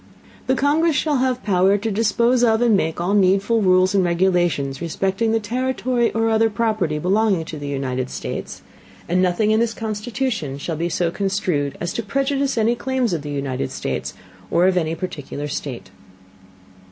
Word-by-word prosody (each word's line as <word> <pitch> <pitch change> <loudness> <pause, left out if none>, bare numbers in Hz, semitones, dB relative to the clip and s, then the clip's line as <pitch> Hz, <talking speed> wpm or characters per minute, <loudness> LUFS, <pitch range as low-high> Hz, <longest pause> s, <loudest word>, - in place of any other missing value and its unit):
The 260 - +3
Congress 300 +4 +2
shall 295 -1 +1
have 255 -1 0
Power 195 0 +3
to 220 +2 -3
dispose 235 +4 +2
of 220 -2 +4
and 230 -3 +4
make 160 -4 -1
all 180 +3 0
needful 200 +3 +3
Rules 185 -1 +4
and 195 -2 +3
Regulations 175 -6 +1
respecting 195 +6 -1
the 225 - +2
Territory 245 +1 -1
or 225 0 +1
other 225 0 +3
Property 215 -7 0
belonging 190 +1 +1
to 155 -2 -7
the 145 - -6
United 130 -2 -2
States; - - -6 0.4
and 180 +2 +2
nothing 185 +4 +2
in 220 - +3
this 230 -1 0
Constitution 220 - -3
shall 160 +3 -4
be 170 +3 -2
so 170 -1 0
construed 185 -8 -1
as 175 - -3
to - - -2
Prejudice 275 +4 -1
any 225 +1 +3
Claims 250 -3 -1
of 165 - -2
the 145 - -7
United 135 -2 -3
States, - - -4 0.3
or 170 +2 +3
of 190 0 +3
any 165 -2 0
particular 150 -4 -5
State. 130 -9 -6
195 Hz, 175 wpm, -21 LUFS, 170-230 Hz, 0.4 s, of